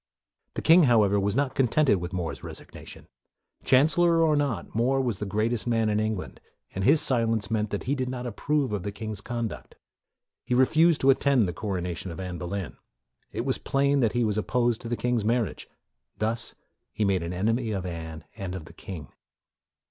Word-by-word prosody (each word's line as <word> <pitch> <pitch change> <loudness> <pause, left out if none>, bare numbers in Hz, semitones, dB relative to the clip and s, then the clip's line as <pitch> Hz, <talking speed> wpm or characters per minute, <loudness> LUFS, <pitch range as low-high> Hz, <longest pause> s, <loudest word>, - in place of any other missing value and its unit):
The - - -4
king, 165 0 +7
however, 105 -5 +4
was 100 +1 0
not 135 0 +1
contented 135 -2 +3
with 90 0 -5
More's 90 -4 -4
resignation. - - -10 0.6
Chancellor 165 +5 +4
or 155 -2 +3
not, 145 -4 -2
More 125 +4 +2
was 120 -7 -1
the 105 - -3
greatest 110 +4 -1
man 115 -2 +2
in 105 0 +1
Eng 110 0 0
land, 90 - -9 0.3
and 95 - -3
his 150 +9 +5
silence 115 -6 +1
meant 110 -1 0
that 100 - -3
he 135 - -1
did 130 -2 -1
44 - - -3
MORE 125 - -5
not - - -4
approve 140 +2 -1
of 105 - -1
the 100 - -4
king's 105 -1 -6
conduct. 115 0 -5 0.7
He 125 - -1
refused 160 +5 +4
to 135 - +6
attend 135 -5 +3
the 90 - -3
coronation 90 -3 -4
of 85 - -7
Anne 90 -2 -5
Boleyn. 90 0 -5 0.5
It - - -3
was - - 0
plain 140 +1 +1
that 115 -5 +2
he 120 -1 +1
was 105 -1 0
opposed 120 +1 0
to - - -6
the 120 - -1
king's 120 -3 0
marriage. 115 -5 -1 0.5
Thus 110 +2 -1 0.4
he 105 0 -1
made 95 -2 +1
an 85 +1 -4
enemy 115 +6 0
of 95 -4 -3
Anne 80 -3 -6
and 95 -4 -5
of 85 -4 -7
the - - -13
king. 80 -8 -8
110 Hz, 200 wpm, -26 LUFS, 100-130 Hz, 0.7 s, king